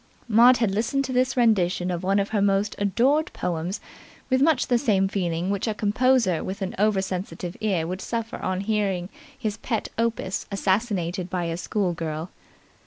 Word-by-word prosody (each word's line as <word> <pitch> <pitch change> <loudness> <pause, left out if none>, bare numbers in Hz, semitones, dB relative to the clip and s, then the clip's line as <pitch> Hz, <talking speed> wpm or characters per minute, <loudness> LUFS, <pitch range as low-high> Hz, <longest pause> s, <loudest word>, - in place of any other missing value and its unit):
Maud 240 +3 +6
had 225 -5 +1
listened 235 +7 0
to 260 - -4
this 255 +1 +1
rendition 185 -6 +2
of 175 -1 -2
one 195 +2 +1
of 200 0 0
her 210 -2 0
most 200 +1 +1
adored 250 +10 +2
poems 175 +2 -3 0.5
with 260 0 +3
much 285 -4 +3
the 245 -1 +2
same 200 -7 +2
feeling 180 -2 -1
which 200 +2 -1
a 220 - -1
composer 215 -3 +2
with 195 +1 -4
an 185 - -3
over 205 -2 +2
sensitive 185 -1 -5
ear 190 -7 +1
would 185 +3 -4
suffer 230 +1 -3
on 185 0 -2
hearing 195 -4 -1 0.3
his 215 -5 -3
pet 225 0 -3
opus 230 -5 -1
assassinated 190 -3 0
by 180 -1 -2
a 165 -1 -2
schoolgirl. 170 -4 -2
200 Hz, 175 wpm, -25 LUFS, 185-230 Hz, 0.5 s, Maud